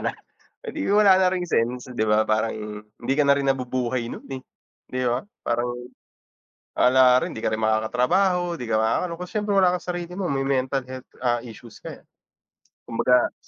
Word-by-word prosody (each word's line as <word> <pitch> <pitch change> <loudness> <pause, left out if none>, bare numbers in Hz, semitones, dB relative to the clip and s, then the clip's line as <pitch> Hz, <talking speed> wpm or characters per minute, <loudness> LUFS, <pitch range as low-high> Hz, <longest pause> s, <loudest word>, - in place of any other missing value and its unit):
na, - - 0 0.6
eh, - - -1
di 300 - -2
wala 205 -2 +6
na 185 -1 +3
ring 180 -1 -2
sense. 125 0 -1
Di 110 - +1
ba 105 0 +2
parang, 110 +1 +1 0.3
hindi 110 +5 -4
ka 150 - +3
na 140 - +4
rin 140 -1 -1
nabubuhay 125 -2 -1
'nun, - - -9
eh, 130 -1 -6 0.4
di 130 - -4
ba? 120 +1 0 0.2
Parang 120 +1 -1 1.1
wala 125 0 +6
rin, - - -4
di 110 - -7
ka - - +1
rin 110 - -1
makakatrabaho, 125 - +1
di 125 - -7
ka 110 -1 +1
makakaano, 115 +11 0
kasi, 180 0 -7
siyempre, 210 -1 -1
wala 180 -1 +4
kang 180 - -7
sarili 175 0 -5
mo, 195 0 -3
may 135 0 -1
mental 135 0 0
health, 130 0 -9
ah, 120 -2 0
issues 115 -1 -12
ka, - - -6
eh. - - -12 0.8
Kumbaga, 125 +1 +2
130 Hz, 190 wpm, -24 LUFS, 120-175 Hz, 1.1 s, wala